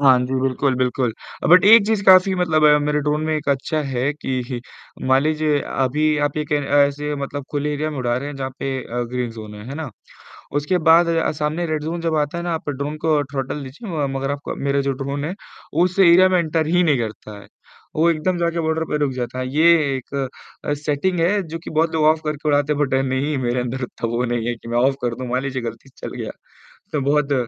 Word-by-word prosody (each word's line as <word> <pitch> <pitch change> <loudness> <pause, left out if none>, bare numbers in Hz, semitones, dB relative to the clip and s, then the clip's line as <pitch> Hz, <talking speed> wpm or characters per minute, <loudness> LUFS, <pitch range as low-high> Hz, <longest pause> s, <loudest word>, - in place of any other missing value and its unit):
हाँ 135 -3 +6
जी, 130 - -3
बिल्कुल 135 +1 +1
बिल्कुल, 125 -1 0 0.4
बट 180 +3 +7
1 215 0 +8
चीज़ 220 -2 +1
काफ़ी 190 0 +6
मतलब 165 -4 +1 0.2
मेरे 150 0 0
ड्रोन 150 +1 0
में 155 0 0
अच्छी 140 +3 0
है 135 +1 -1
कि 130 -4 -4 0.5
मान 130 +1 +4
लीजिए 155 -1 +1
अभी 140 +4 0 0.2
आप 145 - -6
एक 150 -1 -3
ऐसे 145 0 +1
मतलब 140 0 -5
खुले 150 0 -1
एरिया 155 +2 -2
में 150 - -6
उड़ा 120 -1 0
रहे 140 +3 -4
हैं 145 - -7
जहाँ 135 -1 -4
पे 135 - -2
अ, 120 +1 -3
ग्रीन 125 -1 -2
ज़ोन 110 -2 -9
है, 105 0 -10
है 135 - -6
ना? 155 -3 -5 0.6
उसके 145 +5 0
बाद 170 +1 +6 0.3
सामने 155 +3 -1
रेड 155 -2 -2
ज़ोन 165 +2 -3
जब 165 -1 0
आता 150 +3 -1
है 170 - -4
ना? 175 -1 -1
आप 160 -2 -4
ड्रोन 145 +2 -4
को 155 -2 +3
थ्रॉटल 135 +1 -3
दीजिए, 150 - -4
मगर 135 +1 -1
आपका 145 0 -5
मेरा 140 0 0
जो 140 - -1
ड्रोन 140 +2 -4
है, 170 - -3 0.4
उस 180 +4 +1
एरिया 185 0 +7
में 185 - +3
एंटर 160 -1 0
ही 175 +2 +3
नहीं 150 -5 +3
करता 105 -2 -6
है। - - -15 0.5
वो 165 +2 +3
एकदम 170 +3 0
जाकर 170 0 0
बॉर्डर 160 0 0
पे 150 - 0
रुक 145 -2 0
जाता 125 0 -4
है, 130 - -2
ये 155 -3 +4
एक 130 - -11 0.5
अ, 145 - 0
सेटिंग 150 +5 -1
है, 195 +5 +2
जो 165 0 -7
कि - - -7
बहुत 160 +1 +1
लोग 155 - +1
ऑफ 155 +1 +4
करके 150 0 -3
उड़ाते 145 +1 +2
हैं, 145 - -4
बट 135 -2 0
नहीं, 135 +3 -1
मेरे 125 -1 -1
अंदर 125 +2 -4
इतना 120 -1 -4
वो 120 - 0
नहीं 120 -1 -2
है 120 - -1
कि 115 - -14
मैं 120 - 0
ऑफ 135 +2 +3
कर 120 -1 -1
दूँ। 130 +1 -6
मान 125 +1 0
लीजिए 135 -1 -3
गलती 120 +3 -7
से 130 - -9
चल - - -8
गया, - - -4 0.6
तो 150 - 0
बहुत 150 -1 +2
145 Hz, 230 wpm, -21 LUFS, 130-160 Hz, 0.6 s, 1